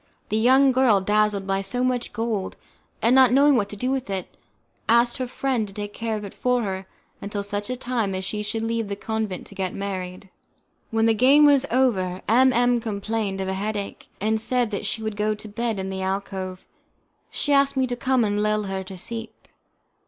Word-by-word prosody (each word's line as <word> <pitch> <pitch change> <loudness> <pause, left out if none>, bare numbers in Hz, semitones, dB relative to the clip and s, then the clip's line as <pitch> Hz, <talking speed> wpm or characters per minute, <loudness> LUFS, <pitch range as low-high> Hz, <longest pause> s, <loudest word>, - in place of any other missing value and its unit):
The 215 - 0
young 265 +4 +5
girl, 250 -5 +4
dazzled 210 0 +1
by 195 0 0
so 245 +6 -2
much 250 -1 -1
gold, 225 -4 -2 0.5
and 230 - +4
not 260 -2 +6
knowing 280 +2 +5
what 205 -4 +1
to - - -7
do 250 +6 -1
with 265 -4 -2
it, 190 -2 -4 0.5
asked 235 +1 +4
her 255 - -3
friend 250 -3 -1
to 195 - -12
take 205 -1 -5
care 225 -1 -2
of 210 - -7
it 200 - -8
for 250 -1 0
her 190 -2 -4 0.3
until 205 0 -4
such 205 0 -3
time 235 -6 -1
as 185 0 -3
she 210 +2 -3
should 220 +2 -3
leave 230 -1 -1
the 200 - -3
convent 215 -2 -3
to - - -12
get 190 -2 -3
married. 190 -1 -5 0.6
When 225 0 +1
the 225 - +4
game 270 +7 +6
was 280 -2 +5
over, 195 -8 +1
M 255 +4 +5
M 245 -1 +2
complained 210 -2 -2
of 190 - -3
a 190 - -1
headache, 205 +1 -4
and 220 +2 0
said 245 -1 +1
that 205 0 -3
she 220 - -2
would 220 -1 -3
go 210 +1 0
to 210 - -7
bed 225 +1 -2
in 190 0 -3
the 190 0 -4
alcove: 190 -1 -4 0.6
she 290 - -1
asked 275 -1 +3
me 260 - +3
to 245 -1 -3
come 255 0 +1
and 205 -1 0
lull 215 0 +1
her 195 -1 -3
to 190 0 -9
sleep. 225 +3 -7
215 Hz, 210 wpm, -24 LUFS, 200-245 Hz, 0.6 s, not